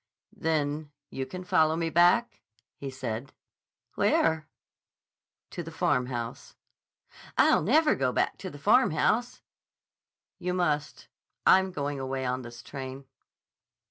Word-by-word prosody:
"Then 150 Hz, -1 st, -1 dB, 0.2 s
you 130 Hz, 0 st, -4 dB
can 185 Hz, +6 st, -7 dB
follow 160 Hz, -3 st, +3 dB
me 165 Hz, 0 st, -1 dB
back?" 175 Hz, +9 st, +3 dB, 0.3 s
he 140 Hz, -, -6 dB
said. 130 Hz, -1 st, -5 dB, 0.6 s
"Where?" 160 Hz, -1 st, +2 dB, 1.0 s
"To -, -, -5 dB
the -, -, -7 dB
Farmhouse." 120 Hz, -2 st, -2 dB, 0.8 s
"I'll -, -, +5 dB
never 300 Hz, -, +4 dB
go 130 Hz, -2 st, 0 dB
back -, -, 0 dB
to 185 Hz, 0 st, -6 dB
the 145 Hz, -, -10 dB
Farmhouse." 230 Hz, -, +2 dB, 1.0 s
"You 180 Hz, 0 st, -2 dB
must. 150 Hz, -5 st, -1 dB, 0.4 s
I'm 190 Hz, 0 st, +5 dB
going 145 Hz, -3 st, -3 dB
away 130 Hz, 0 st, -3 dB
on 125 Hz, +1 st, -1 dB
this 120 Hz, -1 st, -10 dB
train." 135 Hz, -1 st, -7 dB
150 Hz, 115 wpm, -28 LUFS, 130-180 Hz, 1.0 s, I'll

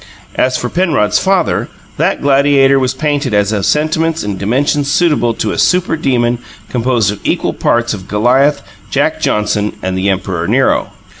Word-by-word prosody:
As 130 Hz, 0 st, +1 dB
for 125 Hz, -, -3 dB
Penrod's 155 Hz, -, +1 dB
father, 190 Hz, -3 st, 0 dB, 0.3 s
that -, -, 0 dB
gladiator 140 Hz, -1 st, +4 dB
was 130 Hz, 0 st, -1 dB
painted 145 Hz, -4 st, -1 dB
as 105 Hz, 0 st, +2 dB
of 100 Hz, -3 st, -1 dB
sentiments 160 Hz, +2 st, 0 dB
and 100 Hz, -2 st, -4 dB
dimensions 140 Hz, +6 st, 0 dB
suitable 150 Hz, -9 st, +1 dB
to 110 Hz, -, -2 dB
a -, -, -3 dB
super 180 Hz, -2 st, +2 dB
demon 120 Hz, -5 st, 0 dB, 0.3 s
composed 120 Hz, -4 st, +1 dB
of 105 Hz, -, -7 dB
equal -, -, -1 dB
parts 120 Hz, 0 st, 0 dB
of 95 Hz, -3 st, -8 dB
Goliath, 125 Hz, +8 st, +2 dB, 0.3 s
Jack -, -, 0 dB
Johnson 105 Hz, 0 st, 0 dB
and 95 Hz, 0 st, -2 dB
the 95 Hz, +2 st, 0 dB
Emperor 95 Hz, -3 st, -2 dB
Nero. -, -, +1 dB
125 Hz, 160 wpm, -14 LUFS, 105-145 Hz, 0.3 s, gladiator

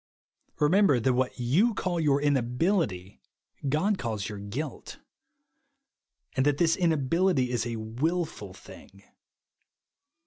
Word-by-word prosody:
Remember 155 Hz, -2 st, +4 dB
that 130 Hz, +3 st, +2 dB
ivhat 125 Hz, 0 st, 0 dB
you 165 Hz, -, +2 dB
call 180 Hz, -3 st, -2 dB
your 145 Hz, -3 st, +2 dB
in 145 Hz, 0 st, +2 dB
ahility 125 Hz, -, -1 dB, 0.5 s
God 190 Hz, +8 st, +1 dB
calls 110 Hz, -4 st, -3 dB
your 105 Hz, -1 st, -7 dB
guilt; 120 Hz, +9 st, -6 dB, 1.4 s
and 130 Hz, -, +2 dB
that 145 Hz, 0 st, +2 dB
this 165 Hz, 0 st, +3 dB
inability 165 Hz, -3 st, +1 dB
is 120 Hz, -2 st, -1 dB
a 115 Hz, -, -3 dB
luilful 140 Hz, +11 st, -3 dB
thing. -, -, -15 dB
140 Hz, 115 wpm, -27 LUFS, 120-170 Hz, 1.4 s, Remember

